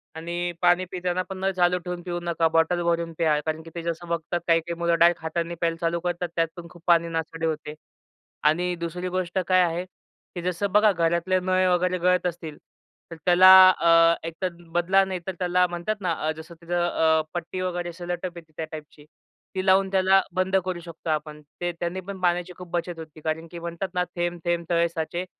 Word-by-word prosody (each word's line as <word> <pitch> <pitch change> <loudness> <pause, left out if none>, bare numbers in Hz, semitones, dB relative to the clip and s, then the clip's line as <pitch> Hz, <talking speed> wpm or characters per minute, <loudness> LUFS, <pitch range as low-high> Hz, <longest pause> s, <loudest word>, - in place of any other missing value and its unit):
आणि 175 +2 -3
पाणी 175 +1 +4
पिताना 180 0 -1
पण 190 - -6
नळ 190 +1 0
चालू 180 0 +4
ठेवून 180 -1 -4
पिऊ 175 -1 -3
नका. 170 -1 +1
बॉटल 165 +2 +2
भरून 170 -1 0
प्या. 155 -3 +2
कारण 155 0 -2
की 165 - -11
ते 170 - -4
जसं 170 +1 -4
बघतात, 170 +1 -2
काही-काही 165 0 +1
मुलं 170 0 +2
डायरेक्ट 170 0 +4
हाताने 170 +1 -2
प्यायला 165 -1 0
चालू 170 0 0
करतात, 175 0 -2
त्यात 165 -1 +2
पण 175 -1 -9
खूप 170 0 -17
पाणी 170 -1 +4
नासाडी 165 0 -3
होते 155 -1 -3 0.8
आणि 175 +3 0
दुसरी 170 +2 -4
गोष्ट 180 -1 -3
काय 185 -1 +5
आहे, 175 0 0 0.5
की 175 - -4
जसं 180 +3 -2
बघा 210 +1 +5
घरातले 170 +1 +1
नळ 185 0 +1
वगैरे 180 +1 +1
गळत 180 0 +2
असतील 165 -3 -6 0.5
तर - - -6
त्याला 180 +1 +7 0.2
अ, 165 -2 +5
एकतर 165 +3 -3 0.2
बदला 185 +3 +3
नाही 185 -1 -4
तर - - 0
त्याला 180 0 +2
म्हणतात 175 +5 -3
ना, 180 -3 0 0.2
अ, - - +2
जसं 165 +2 -10
तिथे 170 +1 -6
अ, 160 -2 +2
पट्टी 175 +1 -4
वगैरे 175 -1 -2
असं 170 - -11
सेलो 175 0 -1
टेप 180 -1 -5
येते 165 -2 -12
त्या 160 - -3
टाइपची. 150 -1 -10 0.5
ती 185 0 -2
लावून 190 0 +4
त्याला 190 0 +4
बंद 185 +1 0
करू 185 -2 -3
शकतो 170 -1 -8
आपण. 150 -1 -3 0.2
ते 175 0 0
त्याने 175 +2 -3
पण 195 +1 -8
पाण्याची 180 0 0
खूप 180 -1 -10
बचत 175 -1 -3
होते. 160 -1 -10
कारण 160 +1 -3
की 170 - -7
म्हणतात 170 +3 -4
ना 180 - +1
थेंब, 175 0 -2
थेंब 170 -1 0
तळे 170 -1 +3
साचे. 170 +2 -4
175 Hz, 205 wpm, -25 LUFS, 165-180 Hz, 0.8 s, त्याला